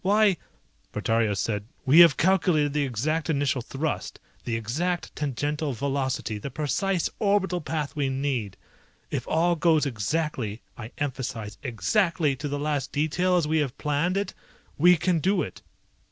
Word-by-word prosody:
Why 205 Hz, -1 st, +4 dB, 0.3 s
..." -, -, -39 dB
Portario 110 Hz, -3 st, +1 dB
said, 105 Hz, 0 st, -1 dB, 0.2 s
"We 140 Hz, +5 st, +6 dB
have 170 Hz, -5 st, +8 dB
calculated 165 Hz, -5 st, +3 dB
the 145 Hz, -1 st, +1 dB
exact 150 Hz, +7 st, -1 dB
initial 140 Hz, -4 st, +1 dB
thrust, 145 Hz, +6 st, -4 dB, 0.3 s
the 115 Hz, -, -1 dB
exact 155 Hz, +11 st, -2 dB
tangential 145 Hz, +1 st, -2 dB
velocity, 130 Hz, -4 st, -2 dB
the 140 Hz, -, -5 dB
precise 160 Hz, +6 st, 0 dB
orbital 200 Hz, -4 st, +1 dB
path 150 Hz, -1 st, -3 dB
we 140 Hz, -3 st, 0 dB
need. 130 Hz, -6 st, -2 dB, 0.5 s
If -, -, -3 dB
all 170 Hz, +2 st, +2 dB
goes 160 Hz, -2 st, +3 dB
exactly, 125 Hz, -, -2 dB
I 115 Hz, -1 st, -8 dB
emphasize, 115 Hz, -7 st, -4 dB
exactly, 155 Hz, -, +1 dB
to 145 Hz, -, -4 dB
the 145 Hz, 0 st, -2 dB
last 145 Hz, -2 st, -2 dB
detail 165 Hz, +5 st, +1 dB
as 165 Hz, -4 st, +1 dB
we 160 Hz, +1 st, +2 dB
have 140 Hz, -3 st, -2 dB
planned 150 Hz, +6 st, 0 dB
it 200 Hz, -, -2 dB, 0.4 s
we 175 Hz, +3 st, +6 dB
can 175 Hz, +1 st, +1 dB
do 185 Hz, +1 st, +2 dB
it! -, -, -8 dB
150 Hz, 155 wpm, -26 LUFS, 130-170 Hz, 0.5 s, have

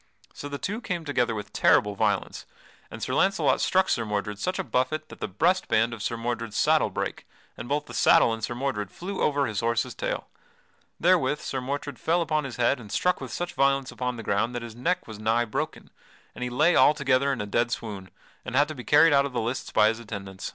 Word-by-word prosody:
So 145 Hz, -, -7 dB
the 140 Hz, -, -4 dB
two 210 Hz, -, -4 dB
came 175 Hz, -7 st, -4 dB
together 125 Hz, -6 st, 0 dB
with 105 Hz, -1 st, -7 dB
terrible 105 Hz, 0 st, +4 dB
violence 100 Hz, -1 st, -1 dB, 0.4 s
and -, -, -8 dB
Sir -, -, -2 dB
Launcelot 195 Hz, 0 st, +2 dB
struck 190 Hz, 0 st, +3 dB
Sir 115 Hz, -, +1 dB
Mordred 105 Hz, -1 st, -3 dB
such 185 Hz, -, -2 dB
a 190 Hz, -, -1 dB
buffet 155 Hz, +2 st, -1 dB
that -, -, -12 dB
the -, -, -3 dB
breast 180 Hz, -, +1 dB
band 115 Hz, +2 st, +2 dB
of 115 Hz, -, -7 dB
Sir 115 Hz, -, -2 dB
Mordred's 115 Hz, -2 st, -3 dB
saddle -, -, +3 dB
brake, -, -, -4 dB, 0.3 s
and 120 Hz, -, -8 dB
both 145 Hz, +1 st, 0 dB
the 120 Hz, -, -11 dB
saddle 115 Hz, -1 st, +5 dB
and 115 Hz, -1 st, -6 dB
Sir 120 Hz, -, -2 dB
Mordred 120 Hz, -6 st, -2 dB
flew 190 Hz, -, -6 dB
over 145 Hz, -1 st, +2 dB
his 110 Hz, -5 st, -2 dB
horse's 115 Hz, +1 st, 0 dB
tail. -, -, -3 dB, 0.7 s
Therewith 165 Hz, -5 st, +3 dB
Sir 130 Hz, -, -4 dB
Mordred 140 Hz, 0 st, -4 dB
fell 170 Hz, +1 st, +1 dB
upon 155 Hz, -3 st, -1 dB
his 130 Hz, -, -6 dB
head 125 Hz, +2 st, +2 dB
and 105 Hz, -4 st, -11 dB
struck 180 Hz, -, +1 dB
with -, -, -6 dB
such 175 Hz, 0 st, -4 dB
violence 135 Hz, -1 st, +1 dB
upon 125 Hz, -1 st, -3 dB
the 115 Hz, -, -7 dB
ground 110 Hz, +5 st, 0 dB
that 120 Hz, -, -3 dB
his 115 Hz, -1 st, -8 dB
neck 180 Hz, +9 st, -1 dB
was 110 Hz, -2 st, -9 dB
nigh 115 Hz, +2 st, +1 dB
broken, 110 Hz, -, -4 dB, 0.4 s
and -, -, -6 dB
he 125 Hz, -, -2 dB
lay 125 Hz, +8 st, +3 dB
altogether 140 Hz, -2 st, +4 dB
in 130 Hz, -, -2 dB
a 105 Hz, -, -2 dB
dead 120 Hz, +4 st, 0 dB
swoon 100 Hz, -5 st, -5 dB, 0.3 s
and 125 Hz, -, -5 dB
had 145 Hz, +2 st, +4 dB
to -, -, -4 dB
be 125 Hz, -4 st, -9 dB
carried 150 Hz, +3 st, +5 dB
out 140 Hz, 0 st, +4 dB
of 135 Hz, -, -11 dB
the 120 Hz, -, -1 dB
lists 120 Hz, +3 st, -3 dB
by 105 Hz, -, +5 dB
his 115 Hz, +1 st, -3 dB
attendants. 100 Hz, -4 st, -7 dB
125 Hz, 230 wpm, -26 LUFS, 110-150 Hz, 0.7 s, saddle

